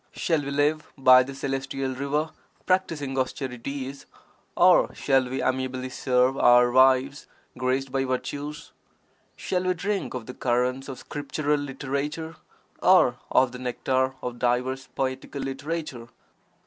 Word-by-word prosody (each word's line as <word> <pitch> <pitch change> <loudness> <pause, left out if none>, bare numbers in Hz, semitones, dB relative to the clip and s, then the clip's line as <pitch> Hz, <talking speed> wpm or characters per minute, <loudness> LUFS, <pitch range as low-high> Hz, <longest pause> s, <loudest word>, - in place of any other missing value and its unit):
Shall 160 -3 0
we 140 - -5
live 150 +2 0
by 130 -1 +7
the 135 +1 -5
celestial 135 0 -3
river 145 +4 -2 0.3
practising 165 -7 0
austerities, 130 +1 -4 0.5
or - - +5
shall 130 -2 +1
we 130 - -3
amiably 130 0 -2
serve 130 +1 +1
(our) 120 0 +6
wives 130 +2 +3 0.3
graced 130 +1 -1
by 135 0 0
virtues? 145 +3 -4 0.6
Shall 180 -1 -2
we 185 0 +1
drink 195 -2 -2
of 120 -3 -5
the 125 - -8
currents 125 +2 -1
of 130 - -6
scriptural 145 0 -2
literature, 145 +4 -4 0.4
or - - +5
of 130 -1 +3
the 125 - -8
nectar 130 +1 -1
of 120 -1 -5
diverse 125 +2 0
poetical 135 +1 -4
literature? 135 -2 -5
135 Hz, 130 wpm, -25 LUFS, 130-145 Hz, 0.6 s, by